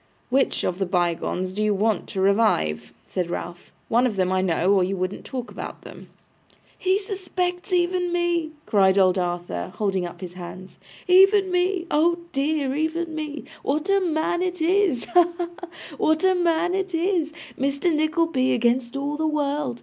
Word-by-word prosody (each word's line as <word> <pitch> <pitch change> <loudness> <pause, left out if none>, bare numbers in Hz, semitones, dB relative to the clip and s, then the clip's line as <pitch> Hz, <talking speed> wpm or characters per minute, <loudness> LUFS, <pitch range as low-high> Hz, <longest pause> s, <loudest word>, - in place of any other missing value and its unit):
'WHICH 270 +1 +2
of 180 +1 -2
the 195 - +1
bygones 180 +1 -1
do 210 - -3
you 210 -1 +2
want 215 +2 0
to 195 - -5
revive?' 195 - +2
said 180 -2 -3
Ralph. 175 0 -6 0.2
'One 240 +2 +3
of 220 - -3
them, 185 -1 +1
I 185 0 +2
know, 185 +1 +2
or 190 -2 +4
you 190 +2 -2
wouldn't 185 +2 -3
talk 250 -2 -6
about - - -8
them.' - - -12 0.7
'He 375 +1 +2
suspects 370 -2 -3
even 355 0 +1
me!' 345 -2 0 0.2
cried 195 -3 +3
old 185 -1 +4
Arthur, 175 - -3
holding 190 -4 -1
up 175 - -12
his 180 -2 -7
hands. 185 +1 -10 0.3
'Even 385 +1 +5
me! 360 0 +1
Oh 335 +3 +3
dear, 280 -1 0
even 320 +2 -2
me. 300 -2 -5 0.2
What 305 +7 -1
a 395 - +4
man 345 -1 0
it 360 -1 -2
is! 345 -5 +2
Ha, 350 -1 +3
ha, 350 -1 -3
ha! 355 - -8 0.3
What 315 +3 +2
a 375 0 +5
man 350 -1 +1
it 380 -2 -1
is! 335 -2 0 0.2
Mr 280 +6 0
Nickleby 310 -4 +1
against 240 +2 +1
all 285 +1 -2
the 315 0 0
world. 290 -4 -1
295 Hz, 175 wpm, -24 LUFS, -, 0.7 s, Even